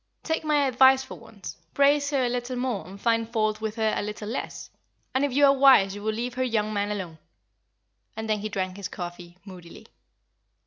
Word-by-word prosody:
Take 320 0 -1
my 300 -2 +2
advice 265 +1 +5
for 265 - -10
once, 200 -3 -10 0.2
praise 285 +1 +3
her 275 -3 +1
a - - +1
little 245 +1 -3
more 245 -9 -3
and 195 +2 -11
find 230 0 +1
fault 215 -2 0
with 220 -1 -3
her 220 -2 +1
a - - -1
little 210 0 -6
less; 240 - -6 0.4
and 260 - +1
if 285 - +1
you 285 +3 +4
are 275 - +6
wise 260 -8 +6
you 205 - -8
will 220 +1 -1
leave 235 +3 -4
her 255 - -1
young 215 -4 -1
man 205 0 -1
alone;" 185 -6 -5 1.0
and 220 0 -4
then 215 -1 0
he 215 +1 -4
drank 185 -2 -3
his 200 -2 -5
coffee, 175 0 -8
moodily. 180 -4 -12
220 Hz, 210 wpm, -26 LUFS, 200-260 Hz, 1.0 s, are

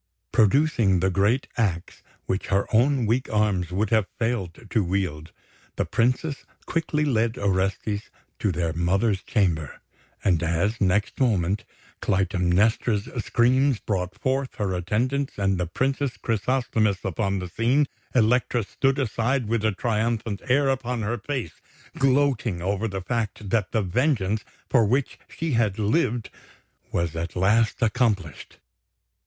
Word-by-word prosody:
Producing 110 - +3
the 95 +2 +1
great 105 +8 +2
axe 90 -7 -1 0.2
which 95 - -2
her 100 0 +1
own 125 +2 +3
weak 120 +5 0
arms 100 -5 +1
would 100 +3 -1
have 110 -3 +3
failed 115 -7 -2
to 110 - +2
wield, 85 -4 -2 0.4
the - - 0
Princess 130 +5 0 0.2
quickly 155 -2 0
led 115 -3 +1
Orestes 100 +2 -1 0.3
to 105 - +1
their 85 -1 -1
mother's 95 +4 +1
chamber; 80 -8 -1 0.4
and 85 -4 +2
as, 85 +8 0
next 100 +2 +1
moment, 100 -6 +1 0.4
Clytemnestra's 100 +3 +1
screams 130 +1 +3
brought 95 -2 -3
forth 130 +3 -1
her 100 -3 -1
attendants 120 +10 -1
and 95 -2 +1
the 90 - -1
Princess 135 - -1
Chrysosthemis 110 -3 0
upon 95 +2 -1
the 90 -1 -4
scene, 120 +10 +2 0.3
Elektra 120 0 +3
stood 135 +6 0
aside 125 -1 0
with 115 0 0
a 110 - +3
triumphant 110 0 -1
air 140 +2 +4
upon 125 -3 -1
her 115 +3 -2
face, 125 - -5 0.4
gloating 135 -7 +2
over 100 +5 -1
the 95 -2 -4
fact 110 -2 -3
that 110 -5 +1
the 110 -3 +1
vengeance 105 - 0 0.2
for 120 -4 +4
which 125 +6 0
she 165 -1 -3
had 110 -5 +1
lived 115 +1 0 0.6
was 85 -2 -1
at 85 +1 -4
last 110 +6 +2
accomplished. 105 - -1
110 Hz, 135 wpm, -25 LUFS, 95-125 Hz, 0.6 s, air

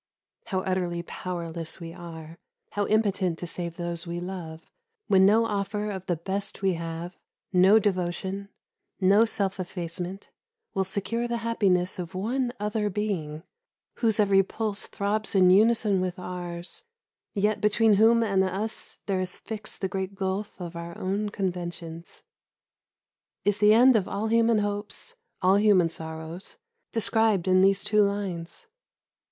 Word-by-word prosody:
How 185 -1 -1
utterly 180 -2 -1
powerless 170 -2 -5
we 165 -1 -7
are, 165 -1 -10 0.3
how 205 -1 -1
impotent 200 -5 +1
to 175 - -5
save 170 -1 -4
those 170 -1 -4
we 170 0 -3
love, 175 -3 -7 0.4
when 190 -1 +5
no 225 +3 +4
offer 210 0 -2
of 190 -1 -6
the 175 - +1
best 195 +4 -3
we 190 -1 +3
have, 165 +1 -5 0.4
no 185 +4 +7
devotion, 190 0 -1 0.5
no 200 +3 +5
self 200 -4 -2
effacement, 180 +1 -5 0.4
will 195 - +1
secure 205 +5 -1
the 235 0 -1
happiness 185 -6 +1
of 180 +1 -6
one 240 +6 -1
other 210 0 -1
being, 180 -7 -3 0.5
whose 225 -3 +1
every 200 -2 +5
pulse 210 +1 -3
throbs 205 +1 -1
in 185 -1 +6
unison 210 -1 +4
with 180 -1 -2
ours, 175 - -6 0.5
yet 210 +1 +1
between 215 +1 +4
whom 225 +3 +5
and 195 -3 +2
us 195 +4 -4
there 190 -2 0
is 185 -1 -5
fixed 215 -2 -6
the 190 - +1
great 190 +1 -4
gulf 195 +1 -3
of 175 -1 -6
our 170 0 -7
own 200 +3 -1
conventions. 175 -4 -5 1.2
Is 205 +1 +2
the 210 +1 +6
end 250 +2 +7
of 205 -4 +2
all 210 +2 -2
human 230 0 +4
hopes, 205 - -3 0.3
all 190 +2 +5
human 200 -5 +4
sorrows, 160 +2 -7 0.3
described 220 -4 +2
in 185 0 +5
these 195 0 +4
two 210 0 +3
lines? 200 - -2
190 Hz, 145 wpm, -27 LUFS, 175-210 Hz, 1.2 s, no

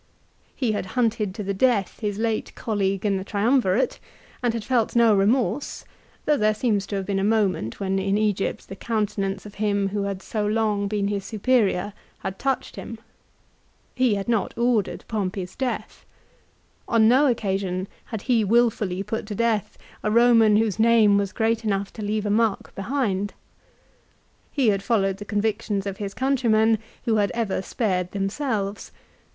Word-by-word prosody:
He 250 -5 0
had 205 -3 -2
hunted 220 -5 +1
to 215 - -4
the 200 0 -2
death 205 -2 +1
his 205 -3 -2
late 225 0 -2
colleague 195 -3 -1
in 200 -2 +2
the 190 - -4
Triumvirate, 215 +2 +1 0.4
and 245 -2 +2
had 230 -1 -4
felt 240 -1 0
no 230 -3 +5
remorse, 220 +4 0 0.4
though 300 -1 +3
there 215 -2 +2
seems 210 -3 0
to 205 - -4
have 195 -1 -2
been 195 0 -1
a - - 0
moment 200 - 0
when 195 -1 0
in 195 +1 +1
Egypt 210 -2 -1
the 195 - -7
countenance 200 -3 -2
of 205 - -10
him 200 -2 +1
who 205 +1 -2
had 195 -1 -4
so 215 -2 -2
long 210 -1 +1
been 200 -1 -1
his 200 -1 -2
superior, 210 -3 +1 0.3
had 190 - -5
touched 270 -1 -2
him. 230 - -7 1.0
He 255 -4 +2
had 200 -1 -4
not 230 -3 0
ordered 235 -4 0
Pompey's 190 -4 -3
death. 260 -2 -4 0.8
On 225 -1 +4
no 265 +5 +5
occasion 195 -5 -1 0.2
had 220 -4 -6
he 240 -4 +2
wilfully 210 -4 +2
put 220 +1 -4
to 210 - -4
death 225 -2 0 0.2
a 210 - 0
Roman 230 -1 +5
whose 215 -1 +1
name 220 -2 +5
was 200 -1 -2
great 225 0 0
enough 200 -2 -1
to 220 - -8
leave 210 0 -1
a 205 - 0
mark 220 -1 +1
behind. 205 -3 -2 1.2
He 265 -6 +2
had 200 -1 +1
followed 195 -3 +1
the 205 - -8
convictions 205 -1 -1
of 195 -1 -4
his 200 -2 -5
countrymen 225 -5 +2 0.3
who 225 -3 +2
had 205 -1 +2
ever 220 -5 -1
spared 185 -4 -1
themselves. 200 0 -2
210 Hz, 170 wpm, -24 LUFS, 195-230 Hz, 1.2 s, no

